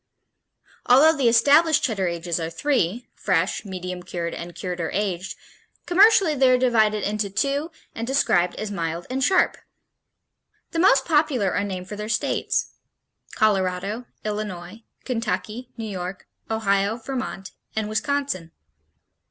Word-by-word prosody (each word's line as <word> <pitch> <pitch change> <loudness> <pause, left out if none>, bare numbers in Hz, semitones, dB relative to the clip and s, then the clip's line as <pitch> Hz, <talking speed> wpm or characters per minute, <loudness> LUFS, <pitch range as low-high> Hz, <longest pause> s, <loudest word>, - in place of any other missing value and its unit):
Although 290 +6 +6
the 265 -5 +3
established 290 +7 +5
Cheddar 195 -7 0
ages 170 0 -2
are 165 0 -3
three, 240 - -1
fresh, 185 0 0
medium 180 -2 -5
cured, 175 -1 -4
and 170 0 -7
cured 180 -1 -4
or 165 - -2
aged, 190 -2 -2 0.5
commercially 385 -2 +5
they 265 -2 +4
are 255 - +5
divided 220 -5 +2
into 210 -1 -1
two 280 - -1 0.2
and 230 +1 -5
described 180 -10 +2
as 215 -1 -5
mild 170 -2 -3
and 265 +1 -1
sharp. 380 +7 +3 1.1
The 330 - -2
most 275 -7 +5
popular 295 - +2
are 200 - 0
named 185 -2 -5
for 210 - -6
their 210 +1 -5
states: - - 0 0.6
Colorado, 200 +2 0 0.2
Illinois, 210 -1 -5 0.2
Kentucky, 230 0 -3
New 225 - -4
York, 185 -2 -6 0.2
Ohio, 205 -1 +1
Vermont 245 -6 -5 0.2
and 220 -1 -1
Wisconsin. 215 -5 -2
215 Hz, 135 wpm, -23 LUFS, 185-255 Hz, 1.1 s, Although